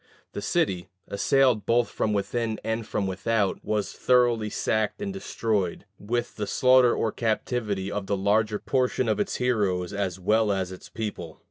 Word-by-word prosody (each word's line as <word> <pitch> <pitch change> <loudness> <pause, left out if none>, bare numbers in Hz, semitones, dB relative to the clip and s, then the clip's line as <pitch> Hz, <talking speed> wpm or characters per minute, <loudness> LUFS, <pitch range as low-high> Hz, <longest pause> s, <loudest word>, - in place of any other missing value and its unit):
The - - -4
city, 90 -2 0 0.2
assailed 120 0 +2
both 120 0 +3
from 110 - -1
within 110 +2 -1
and 110 0 -2
from 100 - -1
without, 100 +2 -1
was 105 -2 -1
thoroughly 120 -4 +2
sacked 110 0 -1
and 200 -1 -3
destroyed, 110 - -2
with 120 +3 -3
the 105 -2 -3
slaughter 130 -1 +5
or 110 - 0
captivity 110 -3 -1
of 100 -1 -3
the 100 - 0
larger 105 +2 +2
portion 130 +1 0
of 110 -2 +1
its - - -1
heroes 100 -7 0
as 95 -2 -2
well 105 +3 +2
as 95 -2 -1
its 95 - -10
people. 100 -8 -6
110 Hz, 160 wpm, -26 LUFS, 100-120 Hz, 0.2 s, slaughter